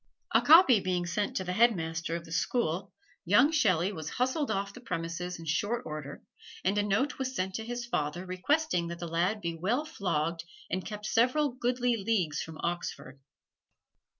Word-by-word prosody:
A - - +6
copy 310 - +8
being 180 -2 -1
sent 185 +4 -2
to 190 - -1
the 180 0 -3
headmaster 165 -7 +1
of 170 0 -5
the 165 - -13
school, 180 -1 -1 0.3
young 240 - +5
Shelley 195 - +2
was 155 -5 -6
hustled 260 +4 0
off 195 0 -2
the 250 - -11
premises 175 -4 -4
in 165 - -10
short 205 +10 -1
order, 150 -2 -7 0.4
and 190 +2 +2
a - - +4
note 215 +9 0
was 260 0 -3
sent 190 +1 -1
to 220 - -3
his 240 +1 -4
father 175 -5 -2
requesting 185 - 0
that 170 0 -5
the 170 - -5
lad 180 +6 0
be 170 -2 -2
well 215 - -1
flogged 170 - -2 0.3
and 185 +2 -1
kept 210 -1 -7
several 255 +7 +3
goodly 245 -1 0
leagues 195 -8 0
from 160 -1 -8
Oxford. 170 -6 -4
190 Hz, 180 wpm, -30 LUFS, 170-240 Hz, 0.4 s, copy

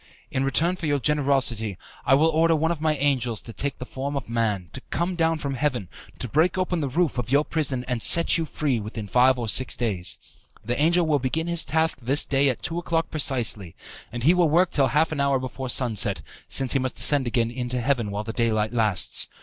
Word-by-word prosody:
In 130 - -1
return 160 +7 +1
for 165 - -4
your 145 -1 +1
generosity, 135 -8 0 0.3
I 135 - +6
will 155 +4 +3
order 165 +1 +3
one 160 +2 0
of 165 -3 -4
my 155 -1 +1
angels 130 -5 0
to 115 - -10
take 140 +3 -3
the 125 - -7
form 140 +3 -4
of 135 - -6
man, 110 -6 -1
to 130 - -4
come 175 +2 -1
down 165 -1 +1
from 140 -2 -4
heaven, 130 - -2 0.3
to - - -3
break 160 - +1
open 180 -2 -1
the 145 -3 -2
roof 155 -2 0
of 125 - -4
your 145 +2 +3
prison, 140 -6 -1
and 125 -3 -2
set 170 +8 +4
you 165 - 0
free 145 -6 -1
within 105 0 -6
five 125 +6 +4
or 120 -2 -3
six 130 +4 +2
days. 100 -7 -1 0.5
The 120 +2 -1
angel 170 +2 +3
will 150 -2 +1
begin 135 +6 -1
his 170 -1 +2
task 160 -2 0
this 135 +5 +1
day 140 0 +2
at 125 - -3
two 165 +1 -2
o'clock 165 -1 -2
precisely, 120 - 0 0.4
and 120 0 -5
he 160 +6 +5
will 175 -3 +3
work 175 +4 +3
till 135 -2 +3
half 155 +4 +1
an 155 - -3
hour 140 -1 +2
before 130 0 -6
sunset, 120 -4 0 0.2
since 135 -2 +2
he 135 - +2
must 130 -1 -3
ascend 140 -4 +3
again 115 -1 0
into 125 0 -3
heaven 120 -3 0
while 100 +1 -4
the 110 +1 -6
daylight 110 -2 0
lasts. 110 -6 +2
135 Hz, 225 wpm, -24 LUFS, 120-155 Hz, 0.5 s, I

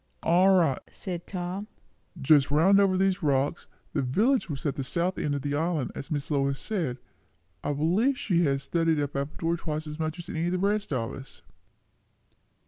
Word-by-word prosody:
"All 180 +3 +5
right," 165 -7 +2
said 175 -3 -6
Tom. 185 +2 -4 0.5
"Just 140 -1 +4
round 175 +8 +5
over 195 -2 +3
these 190 0 +1
rocks. 145 +1 0 0.3
The - - +1
village 210 - +1
was 140 -1 -5
at 140 - 0
the 135 - -3
south 170 +7 -1
end 145 -1 -1
of 140 - -4
the 145 - -2
island, 160 -2 -1
as - - -7
Miss 145 -1 -3
Lois 140 -1 +1
said. 170 - -2 0.7
I 145 - 0
believe 185 - +2
she 180 -11 +1
has 135 -1 0
studied 165 -2 +1
up 145 -1 -2
Appledore 160 +4 -2
twice 155 -2 -4
as 150 +1 -7
much 155 +1 -2
as 175 -1 -8
any 165 +2 -2
of 175 - -1
the - - +1
rest 205 +1 0
of 120 -2 -2
us." 135 -1 -11
160 Hz, 190 wpm, -27 LUFS, 140-185 Hz, 0.7 s, All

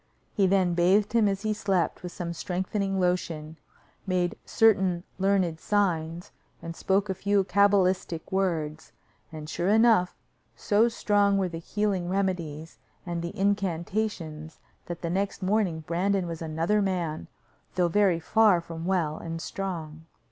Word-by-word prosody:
He 195 -2 +3
then 185 -2 +2
bathed 190 +5 +3
him 225 -3 +4
as 195 0 -1
he 215 0 0
slept, 195 -4 -1
with 180 - -6
some 170 -1 -5
strengthening 190 +3 -2
lotion, 165 -4 -1 0.5
made 180 -2 0
certain 190 -6 +3 0.2
learned 190 -4 +1
signs, 175 -5 -1 0.3
and 165 0 -7
spoke 195 +3 +1
a 190 - -1
few 200 +1 +1
cabalistic 190 -3 +2
words, 160 -5 -2 0.4
and, 155 -1 -8
sure 175 +4 -1
enough, 220 -4 +4 0.4
so 220 +2 +2
strong 205 -3 +2
were 190 -2 0
the 165 -1 -6
healing 195 0 -1
remedies 170 -5 -3 0.3
and 170 -1 -3
incantations 180 -3 -2 0.3
that 175 0 -6
the 170 - -1
next 195 +1 -2
morning 185 -4 +1
Brandon 180 +4 0
was 165 -1 -6
another 165 +6 0
man, 175 -5 -2 0.5
though 180 -1 +3
very 185 -1 +2
far 210 +1 +4
from 165 0 -7
well 165 -5 0
and 165 0 -5
strong. 165 -4 -5
185 Hz, 140 wpm, -27 LUFS, 165-200 Hz, 0.5 s, him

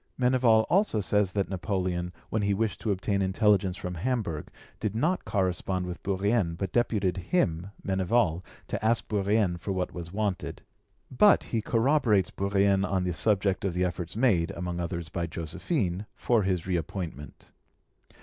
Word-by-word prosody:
Meneval 125 -3 +4
also 195 - +2
says 105 -1 +2
that 100 -2 0
Napoleon, 90 -2 -2 0.2
when 110 - +1
he 100 -1 +1
wished 110 0 -1
to 110 - 0
obtain 100 +1 0
intelligence 95 -1 +2
from 90 - -5
Hamburg, 90 -4 -2 0.3
did 105 0 -2
not 160 +10 0
correspond 95 -2 -1
with 90 -1 -6
Bourrienne, 100 -2 0
but 95 +1 -4
deputed 100 -6 +1
him, 90 - 0 0.2
Meneval, 95 -2 +1 0.2
to - - -4
ask 115 +1 +2
Bourrienne 100 -3 +1
for 95 - -3
what 90 -1 -2
was 85 -1 -7
wanted. 100 -2 -3 0.5
But 205 +10 +5
he 115 - -2
corroborates 115 - +2
Bourrienne 100 0 +2
on 95 -1 0
the 90 -1 -1
subject 100 +1 +1
of 95 -3 -1
the 90 +1 +2
efforts 90 0 -4
made, 105 -9 +2
among 90 0 -4
others 85 -1 -4
by 85 +1 -3
Josephine, 90 - -2
for 120 -3 +2
his 95 -3 -1
reappointment. 85 -4 -5
95 Hz, 155 wpm, -28 LUFS, 90-110 Hz, 0.5 s, But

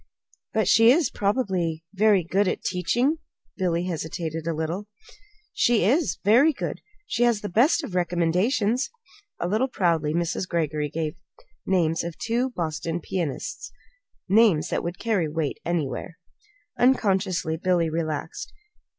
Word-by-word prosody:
"But 220 -4 +1
she 225 +3 +6
is 300 +4 +4
probably 190 -7 -1
very 205 -2 +4
good 195 +4 +1
at - - -2
teaching." 240 - 0 0.4
Billy 175 -2 0
hesitated 160 -1 -4
a 165 - 0
little. 165 +6 -3 0.7
"She 235 -6 +3
is; 290 - +2
very 245 +10 +5
good. - - -5 0.2
She 240 - -3
has 235 -3 +3
the 205 - -4
best 270 - +3
of 250 - -6
recommendations." 180 +8 +1 0.5
A 175 - -1
little 215 +8 +1
proudly 165 - 0
Mrs. 175 +2 -1
Greggory 155 -3 -1
gave 155 0 -3 0.2
the - - -22 0.3
names 165 -3 +2
of 170 -1 -6
two 240 +3 0
Boston 165 -5 -3
pianists 170 -6 -4 0.6
names 200 -5 +4
that - - -1
would 170 +1 -4
carry 210 -8 0
weight 150 -2 -2
anywhere. 165 0 -3 0.6
Unconsciously 195 -9 +2
Billy 175 0 +1
relaxed. 160 -1 -4
180 Hz, 135 wpm, -25 LUFS, 165-220 Hz, 0.7 s, she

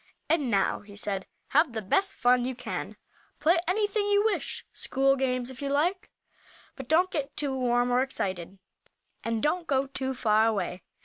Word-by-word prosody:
"And 300 -6 +2
now," 200 -3 +1
he 205 -1 -14
said, 200 -2 -2 0.2
"have 300 -3 +3
the 220 - -3
best 385 - +1
fun 245 0 +3
you 255 +1 -2
can. 240 - -5 0.4
Play 335 +3 +4
anything 415 +2 +1
you 410 0 +4
wish 440 - -1
school 270 +1 +1
games 255 -1 -1
if 260 - -11
you 280 - -2
like 335 +7 0 0.7
but 265 -3 -8
don't 350 +5 +3
get 290 -1 -3
too 280 -3 0
warm 245 -1 +1
or 250 +1 +3
excited. 190 -8 -3 0.7
And 230 -1 -2
don't 330 +3 0
go 270 -1 +2
too 265 -1 -3
far 220 -1 +3
away. 190 -4 -2
265 Hz, 175 wpm, -28 LUFS, 230-305 Hz, 0.7 s, Play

